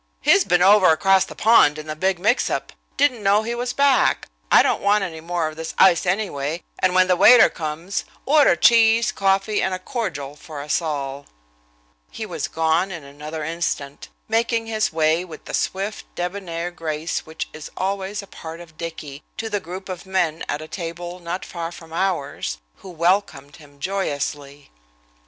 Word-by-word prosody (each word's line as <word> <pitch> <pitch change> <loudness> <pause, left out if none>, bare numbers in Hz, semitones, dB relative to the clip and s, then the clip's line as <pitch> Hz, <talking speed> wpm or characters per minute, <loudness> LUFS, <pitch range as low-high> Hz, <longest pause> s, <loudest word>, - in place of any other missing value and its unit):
He's 200 - +4
been 180 -2 +3
over 200 0 +6
across 190 +4 +4
the - - -11
pond 215 -10 +5
in 155 - -7
the 155 0 -5
big 190 +3 0
mixup. 220 +7 0 0.3
Didn't 270 -5 +2
know 205 +2 +3
he 235 +2 -3
was 245 +1 -2
back. 280 -1 +2 0.2
I - - +7
don't - - 0
want 205 0 +3
any 160 -4 -6
more 170 -1 -1
of 155 - -7
this 160 0 -6
ice, 185 -2 +5
anyway, 170 -5 -2 0.2
and 185 0 +2
when 185 0 +5
the 180 - +3
waiter 235 +6 +7
comes, 165 +4 -4 0.2
order 290 - +5
cheese, 230 +4 +5
coffee 195 +2 +1
and 190 -1 0
a - - -4
cordial 185 - -4
for 155 -1 -10
us 150 +4 0
all." 140 -3 -4 0.8
He - - -6
was - - -4
gone 165 +3 +1
in 170 -5 -7
another 150 +3 -7
instant, 155 -3 -4 0.2
making 230 +1 0
his 215 -1 -1
way 160 +1 +2
with 165 -4 -11
the - - -8
swift, 195 +3 -2
debonair 175 -1 -4
grace 160 -1 -4
which 160 0 -5
is 155 0 -8
always 195 +2 -2
a - - -10
part 165 -3 -9
of 165 -2 -14
Dicky, 155 -4 -7 0.2
to 225 0 -4
the 205 - 0
group 185 +1 -8
of 185 0 -7
men 175 -4 0
at 150 +2 -2
a - - -9
table 175 +1 -6
not 175 +1 -5
far 170 -1 -5
from 165 -2 -12
ours, 165 - -2 0.2
who 190 - -12
welcomed 170 -5 0
him 145 -2 -18
joyously. 145 -5 -4
175 Hz, 180 wpm, -22 LUFS, 155-195 Hz, 0.8 s, I